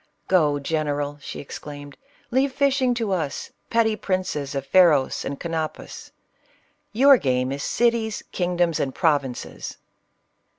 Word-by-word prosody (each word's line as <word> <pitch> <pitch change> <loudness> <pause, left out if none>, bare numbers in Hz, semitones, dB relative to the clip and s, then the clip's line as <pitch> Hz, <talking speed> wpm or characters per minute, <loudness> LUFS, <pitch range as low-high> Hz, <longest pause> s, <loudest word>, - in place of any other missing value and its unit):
— - - -48
" - - -43
Go, 155 -6 +3
general 145 -1 -2
!" - - -29
she - - -7
exclaimed, 145 0 -9 0.2
" - - -34
leave 265 +3 +2
fishing 265 -2 +2
to 225 -4 -2
us, 160 -7 -2 0.2
petty 225 -1 +2
princes 185 -9 -2
of 135 -1 -2
Pha 160 +7 +4
ros 145 -5 +1
and 140 - -5
Canopus; 165 -2 -5 0.8
your 270 +4 +6
game 130 - 0
is 140 +1 -4
cities, 230 +2 0
kingdoms, 175 -3 0
and 135 -3 -2
provinces 140 -6 -1
160 Hz, 145 wpm, -23 LUFS, 145-220 Hz, 0.8 s, your